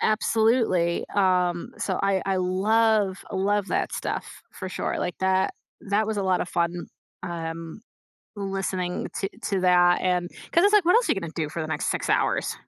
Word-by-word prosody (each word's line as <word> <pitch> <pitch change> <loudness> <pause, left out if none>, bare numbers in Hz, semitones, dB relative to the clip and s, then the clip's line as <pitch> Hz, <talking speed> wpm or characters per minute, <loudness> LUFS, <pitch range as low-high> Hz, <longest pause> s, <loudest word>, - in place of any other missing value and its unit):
Absolutely, 215 -5 +2
um, 180 -3 +1
so, 190 - -1
I 195 -1 +1
I 195 -1 +1
love, 200 +2 +2
love 200 +1 0
that - - -1
stuff, - - -5
for 190 - -7
sure, - - -3
like 180 - -3
that 190 0 +1 0.3
that 210 +2 +2
was 220 - -2
a 200 - 0
lot 185 -1 +1
of - - -3
fun, 170 0 -1 0.4
um, 165 0 -6 0.6
listening 195 -2 -3
to 195 - -2
to 195 -2 0
that, 175 -1 +5
and 180 -1 0 0.2
'cause 340 - +4
it's 405 - +5
like, 415 -4 +5
what 360 - +5
else 475 - +3
are - - +5
you 200 - -3
gonna 170 -4 -6
do 155 -3 -2
for 165 - -4
the 155 - -4
next 160 - -2
6 - - -2
hours? - - +1
190 Hz, 185 wpm, -25 LUFS, 175-205 Hz, 0.6 s, that